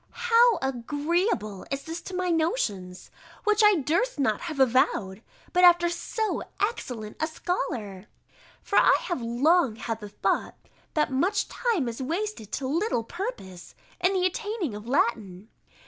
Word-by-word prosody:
How 465 -2 +6
agreeable 270 - -1
is 275 +1 -3
this 330 +1 -6
to 370 - -6
my 365 -1 0
notions; 210 - -2 0.3
which 425 0 +3
I 420 -1 +7
durst 335 - 0
not 220 -6 +1
have 320 -5 -5
avowed, 230 -6 +2 0.3
but 360 - +3
after 345 -1 +6
so 430 +5 -2 0.2
excellent 250 - -3
a 315 - 0
scholar! 230 - -4 0.6
For 400 - +3
I - - +5
have 350 -8 -3
long 255 +3 +2
had 225 0 -4
the 210 -2 -8
thought, 205 - -1 0.4
that 300 -2 +1
much 365 +11 +1
time 440 - 0
is 235 +2 -5
wasted 330 - -3
to 270 - -2
little 325 - 0
purpose 230 - -7 0.3
in 365 +2 +4
the 370 -1 +1
attaining 415 - -2
of 210 +2 -8
Latin. 215 -6 -1
300 Hz, 145 wpm, -26 LUFS, 225-370 Hz, 0.6 s, I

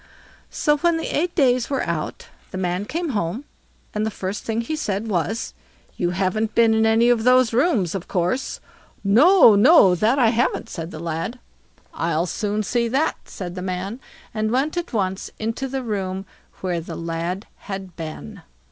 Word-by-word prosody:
So 295 0 +1
when 340 +2 +2
the 325 - -3
eight 345 +3 0
days 255 -5 +3
were 275 -2 0
out, - - -3 0.2
the 185 - -6
man 180 +1 -1
came 335 +7 -3
home, 210 - -2 0.5
and 210 - -1
the 220 - 0
first 195 -1 -5
thing 225 0 -1
he 270 +7 -3
said 210 -7 -2
was: 215 +3 -2 0.4
"You 175 - 0
haven't 195 +4 -1
been 230 -1 +5
into 220 0 +3
any 230 +2 +4
of 235 -2 +3
these 250 -1 +4
rooms, 230 - +2
of 195 -2 -5
course." 180 +8 -1 0.4
"No, 250 - +7
no; 205 - +7
that 215 +9 +2
I 245 -4 +5
haven't", 235 +2 0
said 165 -2 -5
the 155 - -8
lad. 165 +8 -4 0.6
"I'll 165 0 0
soon 210 +3 -2
see 235 +2 0
that", 270 +7 +1
said 180 -2 -6
the 180 - -6
man, 185 +5 -4 0.3
and 215 0 -1
went 270 +7 0
at 345 -1 -3
once 190 -4 -2
into 225 +5 -3
the 265 0 -3
room 195 -4 -3 0.4
where 180 -3 -1
the 165 0 -7
lad 170 +3 -3 0.2
had 190 -3 -6
been. 155 - -7
215 Hz, 175 wpm, -22 LUFS, 185-250 Hz, 0.6 s, No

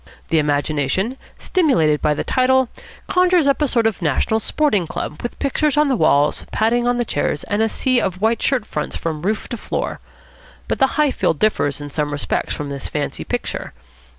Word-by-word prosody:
The 165 - +3
imagination, 150 - 0 0.2
stimulated 170 - +2
by 150 0 +2
the - - -2
title, 260 -1 +2 0.4
conjures 360 -3 +3
up 280 +1 +2
a 295 - +3
sort 235 -3 +1
of 220 -3 0
National 170 +8 +1
Sporting 215 - +1
Club, 150 - -5
with 240 - -5
pictures 295 +1 0
on 300 -1 +4
the 265 - +2
walls, 145 -8 +2
padding 240 +2 +1
on 245 0 +2
the 240 - 0
chairs, 145 -5 -1
and 205 +1 -1
a 225 - +2
sea 255 +2 +1
of 185 -1 -2
white 225 +3 +1
shirt 255 -6 +1
fronts 150 - -4
from 160 -2 -3
roof 210 +5 -1
to 235 - -4
floor. - - -3 0.7
But - - -2
the 270 - +5
Highfield 290 - +2
differs 145 -8 +1
in 145 0 -7
some 150 0 -1
respects 145 -1 -2
from 145 -1 -5
this 140 -1 -4
fancy - - -3
picture. - - -4
215 Hz, 190 wpm, -20 LUFS, -, 0.7 s, the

